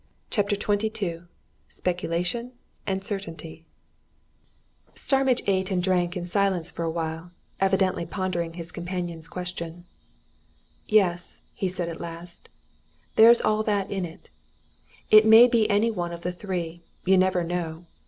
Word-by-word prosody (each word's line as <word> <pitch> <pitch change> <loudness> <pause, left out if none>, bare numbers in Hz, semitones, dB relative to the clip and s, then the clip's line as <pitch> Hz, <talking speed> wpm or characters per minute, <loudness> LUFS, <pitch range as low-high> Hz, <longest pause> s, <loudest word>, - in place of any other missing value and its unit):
CHAPTER 205 -1 +1
XXII 205 -4 -1 0.5
SPECULATION 180 +7 -2 0.3
AND 190 0 -1
CERTAINTY 165 -6 -6 1.3
Starmidge 270 -2 +2
ate 190 -1 +1
and 180 -2 0
drank 180 -1 +1
in 175 - -4
silence 185 -2 0
for - - -6
awhile, 165 +1 -3 0.3
evidently 190 -3 +1
pondering 175 -3 -2
his 170 0 -7
companion's 175 -2 -5
question. 175 -1 -6 1.0
"Yes," 180 -5 +1
he 190 - -2
said 180 -1 -3
at 165 -1 -6
last, 170 +1 -9 0.7
"there's 230 +2 +8
all 215 0 +2
that 205 -2 -1
in 195 -2 -1
it. 165 -2 -9 0.8
It 215 0 +9
may 220 +2 +9
be 230 -3 +2
any 215 +3 +3
one 175 -5 -3
of 170 0 -8
the 180 - -1
three. 175 -3 -4 0.2
You 190 +1 +5
never 185 -1 +3
know! 170 -1 -4
180 Hz, 130 wpm, -26 LUFS, 170-200 Hz, 1.3 s, It